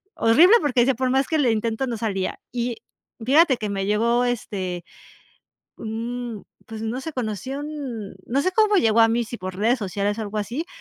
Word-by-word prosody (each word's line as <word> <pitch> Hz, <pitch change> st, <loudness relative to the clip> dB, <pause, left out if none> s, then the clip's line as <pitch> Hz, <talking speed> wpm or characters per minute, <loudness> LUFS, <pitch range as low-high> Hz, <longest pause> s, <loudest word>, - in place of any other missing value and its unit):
horrible, 305 Hz, -, +6 dB
porque 260 Hz, -4 st, +2 dB
decía, 265 Hz, +3 st, +3 dB
por 255 Hz, +2 st, 0 dB
más 270 Hz, +1 st, +2 dB
que 315 Hz, -, 0 dB
le 255 Hz, -5 st, +3 dB
intento 225 Hz, +3 st, -1 dB
no 235 Hz, -2 st, -3 dB
salía, 200 Hz, -4 st, -2 dB
y 240 Hz, -1 st, -2 dB, 0.5 s
fíjate 280 Hz, +1 st, +5 dB
que 215 Hz, -2 st, -4 dB
me 195 Hz, -1 st, -2 dB
llegó, 235 Hz, +4 st, +2 dB
este, 190 Hz, -7 st, -3 dB, 0.9 s
un 230 Hz, 0 st, -5 dB, 0.2 s
pues 220 Hz, -1 st, -7 dB
no 225 Hz, +3 st, -3 dB
sé, 320 Hz, +4 st, -6 dB
conocí 230 Hz, +1 st, -4 dB
un, 280 Hz, -9 st, -6 dB
no 270 Hz, +4 st, 0 dB
sé 370 Hz, -, +1 dB
cómo 425 Hz, 0 st, +4 dB
llegó 230 Hz, -, +4 dB
a 225 Hz, -, +6 dB
mí, 235 Hz, +1 st, +1 dB
sí 235 Hz, +1 st, -8 dB
por 185 Hz, 0 st, -6 dB
redes 230 Hz, +6 st, +2 dB
sociales 205 Hz, +1 st, -2 dB
o -, -, -2 dB
algo 210 Hz, 0 st, -6 dB
así, 240 Hz, +11 st, -3 dB
235 Hz, 195 wpm, -23 LUFS, 215-260 Hz, 0.9 s, horrible